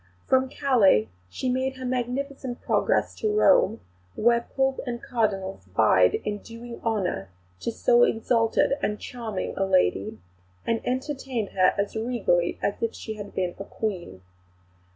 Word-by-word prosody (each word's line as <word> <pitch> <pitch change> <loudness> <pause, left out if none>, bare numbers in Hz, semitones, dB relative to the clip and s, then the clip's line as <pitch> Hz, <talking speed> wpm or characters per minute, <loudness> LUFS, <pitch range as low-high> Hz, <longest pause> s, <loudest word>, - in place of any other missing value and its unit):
From 260 0 +2
Calais 215 - +3 0.2
she 175 - -4
made 260 +1 0
her 260 - -6
magnificent 255 +1 -3
progress - - +1
to 430 - 0
Rome, 425 - +4 0.3
where 235 +1 +2
Pope 265 0 +1
and 240 -1 -3
Cardinals 195 - -2
vied 95 -1 +4
in 205 -1 -2
doing 235 +2 -10
honour 195 - -1 0.3
to - - -2
so 485 - +3
exalted 230 - +2
and 210 0 -1
charming 230 -5 -5
a 195 - 0
lady, 185 - +1 0.5
and 230 -1 0
entertained 260 -4 -2
her 185 -1 +3
as 200 +2 -1
regally 220 -7 0
as 200 - -1
if 230 - -1
she 220 - -6
had 205 -1 -9
been 180 -2 -1
a - - -4
Queen. 185 - -5
230 Hz, 145 wpm, -26 LUFS, 195-255 Hz, 0.5 s, Rome